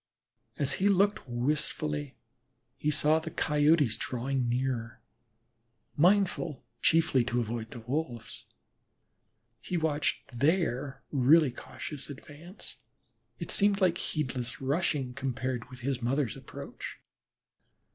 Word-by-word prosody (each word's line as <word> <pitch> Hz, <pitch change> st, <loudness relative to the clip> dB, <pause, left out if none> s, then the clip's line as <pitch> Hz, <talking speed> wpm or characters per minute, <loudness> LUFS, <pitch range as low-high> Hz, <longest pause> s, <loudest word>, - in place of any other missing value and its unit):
As 140 Hz, -1 st, +1 dB
he 200 Hz, -, +5 dB
looked 200 Hz, -6 st, +2 dB
wistfully 120 Hz, -, -1 dB, 0.6 s
he 150 Hz, -, -1 dB
saw 150 Hz, +1 st, +3 dB
the 160 Hz, 0 st, -6 dB
Coyotes 150 Hz, -5 st, +3 dB
drawing 125 Hz, 0 st, -1 dB
nearer, 120 Hz, -2 st, -1 dB, 1.0 s
mindful 175 Hz, -3 st, +2 dB, 0.2 s
chiefly 160 Hz, -6 st, +4 dB
to 125 Hz, 0 st, 0 dB
avoid 115 Hz, -1 st, -3 dB
the 120 Hz, -, -8 dB
Wolves. 120 Hz, -2 st, -4 dB, 1.2 s
He 180 Hz, -, -2 dB
watched 150 Hz, -5 st, -1 dB
their 145 Hz, -3 st, +1 dB
really 145 Hz, +2 st, +5 dB
cautious 140 Hz, +4 st, -8 dB
advance; 150 Hz, +6 st, -10 dB, 0.6 s
it -, -, -3 dB
seemed 200 Hz, -1 st, +4 dB
like 180 Hz, -3 st, +3 dB
heedless 125 Hz, -5 st, -3 dB
rushing 135 Hz, -2 st, 0 dB
compared 130 Hz, -2 st, -3 dB
with 125 Hz, -1 st, -10 dB
his 130 Hz, 0 st, -1 dB
mother's 125 Hz, 0 st, 0 dB
approach. -, -, -8 dB
140 Hz, 105 wpm, -30 LUFS, 125-160 Hz, 1.2 s, he